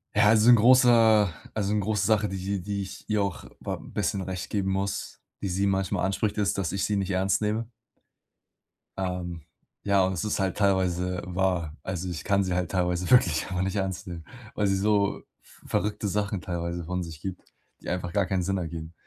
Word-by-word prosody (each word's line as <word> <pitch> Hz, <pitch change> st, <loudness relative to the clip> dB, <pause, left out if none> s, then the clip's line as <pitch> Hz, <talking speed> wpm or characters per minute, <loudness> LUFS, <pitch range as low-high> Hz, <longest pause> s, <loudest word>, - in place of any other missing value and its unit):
Ja, 105 Hz, 0 st, +5 dB
also 110 Hz, +1 st, +5 dB
'n 120 Hz, -, +10 dB
großer 115 Hz, -4 st, +6 dB, 0.2 s
also 105 Hz, -1 st, -1 dB
'ne 105 Hz, -, +2 dB
große 105 Hz, 0 st, 0 dB
Sache, 105 Hz, -1 st, +2 dB
die 95 Hz, 0 st, -3 dB
die 100 Hz, +1 st, -3 dB
ich 95 Hz, -, -8 dB
ihr 105 Hz, -1 st, +2 dB
auch 100 Hz, -2 st, -3 dB
wa -, -, -3 dB
bisschen 100 Hz, -, -3 dB
recht 90 Hz, -1 st, -5 dB
geben 95 Hz, -2 st, 0 dB
muss, 95 Hz, 0 st, -3 dB, 0.2 s
die 100 Hz, -, -2 dB
sie 95 Hz, +3 st, +1 dB
manchmal 95 Hz, -1 st, 0 dB
anspricht, 100 Hz, +2 st, -1 dB
ist, 100 Hz, -1 st, +1 dB
dass 95 Hz, -3 st, -1 dB
ich 100 Hz, -, -1 dB
sie 105 Hz, -, 0 dB
nicht 100 Hz, -1 st, -1 dB
ernst 95 Hz, +1 st, +1 dB
nehme. 110 Hz, +2 st, -1 dB, 1.3 s
Ähm, 90 Hz, -3 st, -3 dB, 0.4 s
ja, 100 Hz, -2 st, +3 dB
und 95 Hz, -, +1 dB
es 90 Hz, -, -3 dB
ist 105 Hz, -, -1 dB
halt 95 Hz, -1 st, 0 dB
teilweise 90 Hz, -2 st, +1 dB
wahr. 90 Hz, -4 st, -1 dB
Also, 90 Hz, 0 st, -3 dB
ich 85 Hz, -, -5 dB
kann 100 Hz, -1 st, +2 dB
sie 90 Hz, -1 st, -2 dB
halt 90 Hz, -1 st, -1 dB
teilweise 90 Hz, -1 st, 0 dB
wirklich 85 Hz, -11 st, +5 dB
einfach 90 Hz, -1 st, -2 dB
nicht 95 Hz, +1 st, -1 dB
ernst 95 Hz, -2 st, -3 dB
nehmen, 85 Hz, -2 st, -7 dB, 0.3 s
weil 105 Hz, -1 st, +1 dB
sie 95 Hz, -, +2 dB
so 100 Hz, 0 st, +1 dB, 0.2 s
v -, -, -19 dB
verrückte 105 Hz, 0 st, -1 dB
Sachen 100 Hz, -1 st, -1 dB
teilweise 85 Hz, -1 st, -3 dB
von 90 Hz, +2 st, -3 dB
sich 80 Hz, -3 st, -9 dB
gibt, 95 Hz, -2 st, -7 dB, 0.3 s
die -, -, -6 dB
einfach 90 Hz, 0 st, -2 dB
gar 100 Hz, +2 st, +2 dB
keinen 95 Hz, -1 st, -1 dB
Sinn 95 Hz, +2 st, 0 dB
ergeben. 85 Hz, -2 st, -5 dB
95 Hz, 200 wpm, -27 LUFS, 90-105 Hz, 1.3 s, n